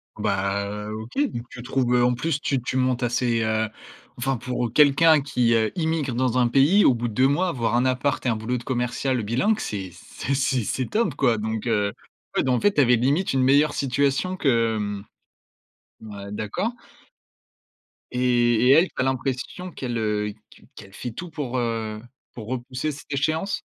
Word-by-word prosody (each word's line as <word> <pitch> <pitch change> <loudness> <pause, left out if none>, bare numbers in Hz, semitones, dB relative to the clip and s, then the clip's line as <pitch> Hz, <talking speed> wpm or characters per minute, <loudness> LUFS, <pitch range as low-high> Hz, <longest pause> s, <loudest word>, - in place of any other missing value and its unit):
Bah, 100 +1 -1
heu, 105 +1 -5
OK. 120 - -6
Donc 115 - -5
tu 125 - -9
trouves 125 -1 +1
en 125 0 +3
plus 150 +1 -2
tu 135 -2 0
tu 120 - -4
montes 130 -1 +1
assez, 120 -1 +1
heu 110 0 0 0.5
Enfin 130 +1 -1
pour 125 -1 -3
quelqu'un 150 +1 +5
qui, 125 -4 +1
heu, 110 -1 +2
immigre 160 -6 -1
dans 130 0 +1
un 120 - +4
pays 140 - +4
au 125 - +5
bout 120 +1 -2
de 110 - -6
2 130 +4 +4
mois, 175 +6 +1
avoir 120 -6 -1
un 125 +2 +2
appart 130 +2 0
et 125 - +2
un 115 - +1
boulot 115 +3 -2
de 120 - -8
commercial 125 0 -1
bilingue. 130 - +1
C'est 95 -4 -4
c'est 125 +9 -5
c'est 130 -3 +1
c'est 130 +3 -2
top 210 - 0
quoi! 125 -5 +2
Donc, 110 +2 -3
heu, 105 -3 +1 0.4
ouais, - - +3
bah, 130 - +1
en 125 - +2
fait, 205 -1 +3
tu 145 - +4
avais 125 -1 +5
limite 140 +10 +1
une 130 -1 +2
meilleure 145 +3 +4
situation 140 +7 0
que 115 -7 +2
hem 105 -1 -4 1.0
ouais 100 -2 -9
d'accord 110 - -2 1.4
et 120 -1 +2
et - - +8
elle, 165 +6 +6
tu - - -23
as - - +1
l'impression 130 +7 -3
qu'elle, 120 -5 -4
heu, 105 -1 -1 0.2
qu - - -19
qu'elle 100 0 -13
fait 120 - -6
tout 175 +9 -7
pour, 140 -6 -4
heu, 110 -2 -2 0.3
pour 110 -3 -9
repousser 130 +4 -3
cette 145 +1 -12
échéance? 155 +7 -1
125 Hz, 190 wpm, -24 LUFS, 115-140 Hz, 1.4 s, et